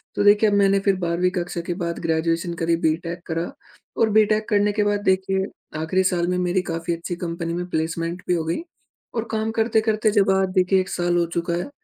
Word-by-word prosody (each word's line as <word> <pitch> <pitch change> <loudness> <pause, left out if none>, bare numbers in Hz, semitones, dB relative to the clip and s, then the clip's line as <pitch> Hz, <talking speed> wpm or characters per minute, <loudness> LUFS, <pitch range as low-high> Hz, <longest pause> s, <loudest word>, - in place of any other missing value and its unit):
तो - - +1
देखिए 205 +1 +5
अब 205 - +1
मैंने 195 0 +4
फिर 195 -1 +4
12वीं 175 +1 +1
कक्षा 175 -1 -3
के 175 - 0
बाद 170 0 -2
ग्रेज़ुएशन 165 +1 0
करी, 165 0 +2
बीटेक 165 +1 -1
करा 165 +1 -3 0.5
और 225 -1 +3
बीटेक 215 0 +3
करने 205 0 +3
के 210 0 +1
बाद 205 0 +1
देखिए 190 0 +1 0.3
आखिरी 185 +4 +1
साल 175 -2 +1
में 180 0 0
मेरी 180 +1 +1
काफ़ी 165 -1 -3
अच्छी 170 +1 -5
कंपनी 170 0 -3
में 175 +1 -3
प्लेसमेंट 165 +2 -2
भी - - +2
हो 165 -2 0
गई 165 - -2 0.5
और 225 - 0
काम 220 0 -1
करते-करते 220 -1 +1
जब 200 -2 +3
आज 190 0 +2
देखिए 185 +1 +3
1 185 -1 -2
साल 175 -1 0
हो 170 - +2
चुका 170 0 -1
है। 175 +9 -2
180 Hz, 215 wpm, -23 LUFS, 170-205 Hz, 0.5 s, देखिए